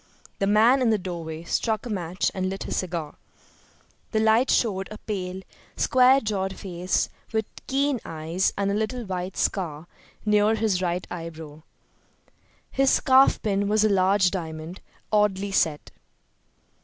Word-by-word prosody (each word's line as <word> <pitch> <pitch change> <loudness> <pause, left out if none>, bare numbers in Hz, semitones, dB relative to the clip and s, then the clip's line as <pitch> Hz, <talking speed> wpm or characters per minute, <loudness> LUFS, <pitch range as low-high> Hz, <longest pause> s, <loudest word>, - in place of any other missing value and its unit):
The 195 - +1
man 225 +6 +5
in 245 - +3
the 220 - +3
doorway 170 -4 -6
struck 220 +6 -1
a - - -5
match 180 -1 -1
and 185 0 -2
lit 195 +1 -5
his - - -4
cigar. 170 -5 -4 1.0
The 220 - +2
light 220 +4 +3
showed 195 -5 +1
a 215 - -8
pale, 190 -3 -5 0.3
square 260 +1 +5
jawed 195 -5 -2
face 180 -1 -1 0.2
with 220 -1 0 0.2
keen 275 -1 +1
eyes, 165 +4 -1
and 200 0 0
a - - 0
little 220 +3 -2
white 185 -1 -4
scar 165 -5 -1 0.4
near 210 +1 +3
his 210 -4 0
right 180 0 -1
eyebrow. 160 -3 -8 1.1
His 270 0 +3
scarfpin 220 -8 +3
was 215 +1 +3
a 215 - +4
large 190 -1 +3
diamond, 160 -1 -6 0.3
oddly 200 -1 +2
set. 160 -5 0
195 Hz, 145 wpm, -25 LUFS, 180-220 Hz, 1.1 s, man